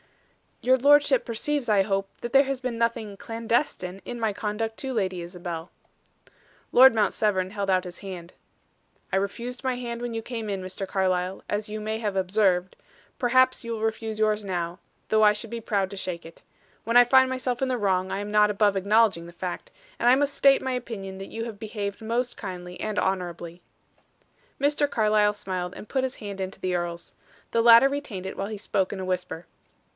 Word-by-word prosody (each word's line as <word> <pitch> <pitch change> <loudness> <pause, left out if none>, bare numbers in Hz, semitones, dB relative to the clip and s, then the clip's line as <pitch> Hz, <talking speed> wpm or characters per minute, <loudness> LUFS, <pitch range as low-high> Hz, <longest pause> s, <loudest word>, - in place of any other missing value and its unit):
"Your 260 +1 +5
lordship 285 -1 +5
perceives, 250 +3 -2
I 200 -2 +4
hope, 195 0 -1
that 240 - -5
there 275 +1 +7
has 270 -1 -3
been 250 -2 -3
nothing 230 -3 -1
'clandestine' 225 -5 -2
in 240 - -6
my 220 -2 0
conduct 220 +2 -3
to 265 -1 -4
Lady 190 -5 -1
Isabel." 175 -1 -6 1.0
Lord 260 +1 +8
Mount 215 -2 +2
Severn 190 -3 +1
held 200 -2 -3
out 185 -1 +3
his 180 -1 -9
hand. 180 -3 -8 0.8
"I - - +4
refused 235 +6 -4
my 260 -1 0
hand 240 -1 -5
when 240 -1 -3
you 225 - -2
came 225 -3 -5
in, 195 -2 -2
Mr. 185 +1 -5
Carlyle, 185 -1 -1
as 210 +1 -2
you 215 +1 -4
may 220 +1 -3
have 210 -3 -2
observed, 185 -1 +1 0.4
perhaps 255 +1 +3
you 230 0 -4
will 220 - -5
refuse 220 0 -2
yours 215 -1 +2
now, 175 -2 -3 0.3
though 220 0 +4
I 210 0 +7
should 215 +2 -7
be 235 -1 -4
proud 200 -4 0
to 200 - -7
shake 175 -3 -4
it. 165 - -13 0.4
When 230 +2 +3
I 245 - +9
find 260 +1 +5
myself 255 -1 -2
in 265 - +2
the 255 -1 0
wrong, 190 -3 0
I - - -2
am 205 0 -5
not 210 0 +5
above 205 -1 +2
acknowledging 200 -2 +3
the - - -10
fact; 180 - -6 0.3
and 240 - +4
I 250 - +7
must 285 +1 +1
state 275 -1 +5
my 260 - -1
opinion 215 -6 -5
that 195 - -8
you 225 0 -4
have 220 -4 -8
behaved 205 -2 -5
most 235 +3 -2
kindly 180 -3 -7
and 215 -1 -3
honorably." 175 -2 -3 1.0
Mr. 290 +1 +2
Carlyle 215 -3 +3
smiled 185 -3 -4
and - - -10
put 265 -1 0
his 260 -1 -2
hand 200 -3 -7
into 190 0 -5
the 185 -1 -1
earl's. 175 -1 -4 0.4
The 230 - +2
latter 235 +3 +8
retained 260 -10 -5
it, - - -6
while 195 - -2
he 215 0 -5
spoke 195 -2 -1
in 200 - -5
a 190 - -4
whisper. 180 -2 -3
210 Hz, 200 wpm, -26 LUFS, 190-235 Hz, 1.0 s, I